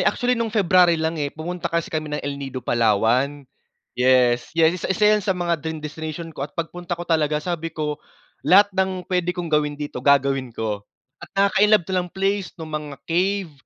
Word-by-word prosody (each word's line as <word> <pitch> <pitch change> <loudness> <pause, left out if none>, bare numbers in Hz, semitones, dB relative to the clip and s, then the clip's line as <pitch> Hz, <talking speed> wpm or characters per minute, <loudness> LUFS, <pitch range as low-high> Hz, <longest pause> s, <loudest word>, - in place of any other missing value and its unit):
actually 245 0 0
nung 230 -2 0
February 180 -5 +4
lang, 160 0 -2
eh, 145 - 0
pumunta 170 +3 -5
kasi 170 -1 -2
kami 155 -1 -2
ng 150 0 -4
El 140 0 -4
Nido 130 -3 -6
Palawan. 120 +5 +2 0.5
Yes, 125 -1 +3
yes, 165 +2 +3
1 - - -3
1 190 +2 +1
yan 210 - +3
sa 190 -1 -1
mga 170 -2 -1
dream 160 +1 -4
destination 160 +2 -6
ko - - -10
at 140 - -5
pagpunta 175 +1 -4
ko 175 - -6
talaga 155 -3 +1
sabi 165 +1 -3
ko, 150 -2 -4 0.5
"Lahat 205 +2 +6
ng 190 -1 -1
puwede 180 0 -1
kong 170 -3 -4
gawin 150 -1 +1
dito, 145 -4 -5
gagawin 135 -1 +2
ko." 105 -2 -4 0.3
At - - -10
nakaka-inlove 200 -1 +4
ta 190 - -6
lang 180 - -5
place, 195 +1 -1
nung 160 -3 -8
mga 150 -2 -5
cave, 185 0 0
165 Hz, 195 wpm, -22 LUFS, 145-180 Hz, 0.5 s, Lahat